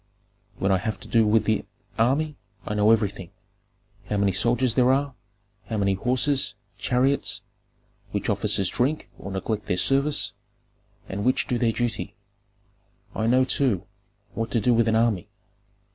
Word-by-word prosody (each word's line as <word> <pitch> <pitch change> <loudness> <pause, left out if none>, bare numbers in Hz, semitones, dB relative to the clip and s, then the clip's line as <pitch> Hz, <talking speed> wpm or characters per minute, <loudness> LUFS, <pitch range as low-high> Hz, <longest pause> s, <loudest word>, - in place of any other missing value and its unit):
"When 95 - +1
I 95 - +3
have 105 0 -3
to - - -10
do 115 -2 +3
with 110 +1 +3
the 110 -2 +1 0.4
army, 140 +6 +2 0.3
I - - -3
know 105 0 +3
everything, 105 -5 +1 0.8
how 105 - 0
many 100 -1 +2
soldiers 120 +5 +1
there 125 +1 +4
are, 140 0 +1 0.5
how 110 - -2
many 100 -1 +2
horses, 130 +7 0 0.2
chariots, 130 +3 +1 0.7
which - - -3
officers 95 -3 +1
drink 140 +5 -1
or 95 - -7
neglect 105 +3 -3
their 90 - 0
service, 140 +8 +1 0.7
and 100 +1 -4
which 130 +3 +2
do 120 - -1
their 115 -2 +2
duty. 115 0 -3 1.0
I 110 - -1
know, 130 +2 +4
too, 130 - +1 0.5
what 115 0 -3
to 115 - +1
do 120 +4 +3
with 115 0 +3
an 110 - +2
army. 110 -3 +1
115 Hz, 155 wpm, -25 LUFS, 105-130 Hz, 1.0 s, there